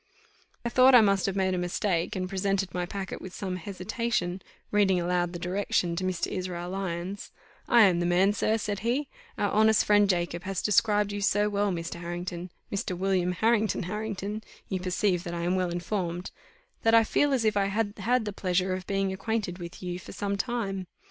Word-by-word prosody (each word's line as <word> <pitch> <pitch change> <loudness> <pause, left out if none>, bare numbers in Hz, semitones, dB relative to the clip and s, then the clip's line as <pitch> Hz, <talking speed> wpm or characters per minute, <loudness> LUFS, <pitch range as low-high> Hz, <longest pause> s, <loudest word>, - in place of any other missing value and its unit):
I - - +1
thought 255 +2 +6
I 240 - +9
must 200 -3 +3
have 195 - -1
made 190 -1 +1
a 180 - 0
mistake, 175 -1 -1
and 185 -1 -2
presented 195 0 -1
my 180 -1 -2
packet 195 0 -5
with 185 - -8
some 185 -2 -3
hesitation, 190 0 -2 0.3
reading 195 -3 +3
aloud 175 0 0
the 175 - -5
direction 180 -1 0
to 185 - -3
Mr. 185 -2 0
Israel 180 -1 -4
Lyons 190 0 -4 0.4
"I 235 -2 +7
am 180 -4 +4
the 175 - +1
man, 185 +3 +4
sir," 215 +2 +1
said 205 -2 -3
he; 250 +7 -1 0.3
"our 205 - 0
honest 220 0 +4
friend 205 -1 +4
Jacob 175 -2 0
has 190 0 -3
described 210 -1 +3
you 205 0 -4
so 205 +1 +2
well, 205 0 +1
Mr. 170 -1 -4
Harrington 175 +1 -5 0.2
Mr. 190 -2 -2
William 185 -1 +1
Harrington 220 +1 +2
Harrington 210 +2 -4 0.3
(you 190 - -1
perceive 180 0 0
that 175 -2 -5
I 170 - -3
am 175 +1 +1
well 185 -1 0
informed) 175 0 -3 0.5
that 225 0 +4
I 225 - +7
feel 290 +6 +2
as 255 -4 +1
if 215 -1 +2
I 200 -1 +2
had 205 +1 -1
had 240 +3 +1
the 205 - -3
pleasure 185 -1 0
of 185 0 -5
being 195 -1 0
acquainted 200 -3 -2
with 170 +1 -8
you 180 0 -3
for - - -10
some 200 0 -2
time. 200 -4 -2
195 Hz, 200 wpm, -28 LUFS, 180-210 Hz, 0.5 s, I